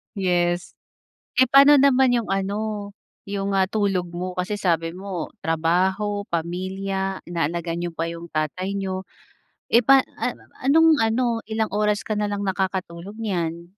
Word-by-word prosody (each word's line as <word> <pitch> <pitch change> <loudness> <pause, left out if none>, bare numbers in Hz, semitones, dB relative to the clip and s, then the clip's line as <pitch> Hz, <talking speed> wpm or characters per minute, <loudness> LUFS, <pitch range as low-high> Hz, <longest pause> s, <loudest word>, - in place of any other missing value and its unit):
yes. 175 -2 0 0.7
Eh, 260 - +7
pa'no 280 +2 +8
naman 265 -2 +5
'yong 235 -4 -1
ano, 205 +1 -2 0.4
'yong, 200 0 -2
ah, 190 -1 +3
tulog 195 -4 0
mo 180 +1 -5
kasi 190 +3 -2
sabi 165 -3 0
mo 185 -3 -5
trabaho, 190 +6 0
pamilya, 190 +3 -3
inaalagaan 170 0 -2
niyo 175 - -2
pa 165 +1 -2
'yong 170 0 -8
tatay 185 +6 -2
niyo. 190 -1 -3 0.7
Eh, 235 - +5
pa 270 0 +7 0.2
an - - -1
mama - - -23
anong 325 +4 +6
ano, 225 +3 +2 0.2
ilang 220 0 -1
oras 210 -1 +1
ka 215 - -2
na 210 -1 0
lang 205 0 -3
nakakatulog 190 0 -3
niyan? 170 -6 -3
190 Hz, 150 wpm, -23 LUFS, 175-210 Hz, 0.7 s, pa'no